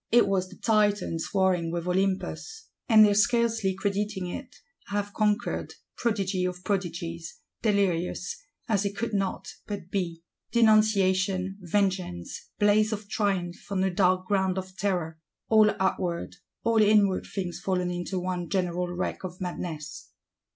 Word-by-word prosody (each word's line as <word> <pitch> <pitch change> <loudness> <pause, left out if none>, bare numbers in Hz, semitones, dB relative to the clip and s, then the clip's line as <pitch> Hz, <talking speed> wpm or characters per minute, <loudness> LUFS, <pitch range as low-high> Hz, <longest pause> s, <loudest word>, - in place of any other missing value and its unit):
It 240 -2 +6
was 190 -2 0
the 185 - -12
Titans 205 -6 +1
warring 185 -4 +2
with 170 0 -3
Olympus; 195 - -2 0.2
and 215 -2 +8
they 205 - +4
scarcely 225 -2 +2
crediting 200 0 -2
it, 250 +8 -7 0.3
have 205 0 -2
conquered: 215 +2 0 0.2
prodigy 195 -5 0
of 180 0 -3
prodigies; 170 -4 -3 0.2
delirious,—as 200 - -1
it 200 0 -3
could 230 -1 -2
not 195 -1 -1 0.2
but 195 -4 -6
be. 170 -4 -2 0.3
Denunciation, 195 -4 +3
vengeance; 180 - -2
blaze 210 +1 +4
of 210 -1 -5
triumph 195 -4 -2
on 190 -1 +1
a 190 -1 0
dark 185 0 +3
ground 190 -2 +1
of 185 0 -5
terror: 175 -5 -2 0.3
all 215 -1 +6
outward, 180 -2 -1 0.3
all 230 -1 +3
inward 205 -2 +4
things 180 -3 -4
fallen 180 -2 -1
into 175 +2 -3
one 180 -2 -3
general 180 -2 0
wreck 175 +2 -3
of 185 -1 -6
madness! 165 -4 -5
190 Hz, 135 wpm, -27 LUFS, 180-210 Hz, 0.3 s, and